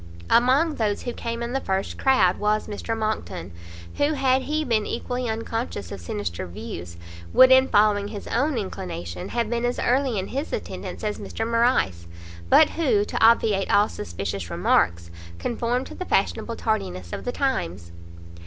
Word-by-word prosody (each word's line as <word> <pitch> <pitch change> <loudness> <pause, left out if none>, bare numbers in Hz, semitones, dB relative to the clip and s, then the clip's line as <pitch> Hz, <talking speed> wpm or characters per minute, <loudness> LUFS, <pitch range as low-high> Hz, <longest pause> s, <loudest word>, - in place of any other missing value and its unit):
Among 270 +7 +4
those 210 -3 -1
who 245 - -3
came 235 0 -4
in 235 +1 -4
the 270 - 0
first 190 0 -2
crowd 255 -10 +3
was 210 +1 +1
Mr 225 +2 -4
Monckton, 215 - -3 0.5
who, 290 +2 +2
had 265 -2 +2
he 305 +3 -1
been 220 -5 +1
equally 245 +1 -3
unconscious 225 - -4
of 95 - -7
sinister 85 0 -4
views, 85 -3 -8 0.4
would 260 0 +8
in 260 0 +7
following 205 -2 +3
his 205 -1 -7
own 275 +3 0
inclination, 175 - -5
have 235 -1 -1
been 235 +1 -2
as 245 0 0
early 255 -2 +1
in 190 0 -3
his 280 +4 -3
attendance - - -5
as 210 -1 -2
Mr 225 - -4
Morrice; 230 - +1 0.4
but 315 - +6
who, 245 -11 +2
to - - -2
obviate 220 -3 +4
all 205 +1 +5
suspicious 95 - -5
remarks, 85 0 +1 0.3
conformed 240 - -1
to - - -9
the 370 - -6
fashionable 230 - 0
tardiness 90 - -2
of - - -5
the 245 - -2
times. 90 - -2
220 Hz, 165 wpm, -24 LUFS, -, 0.5 s, would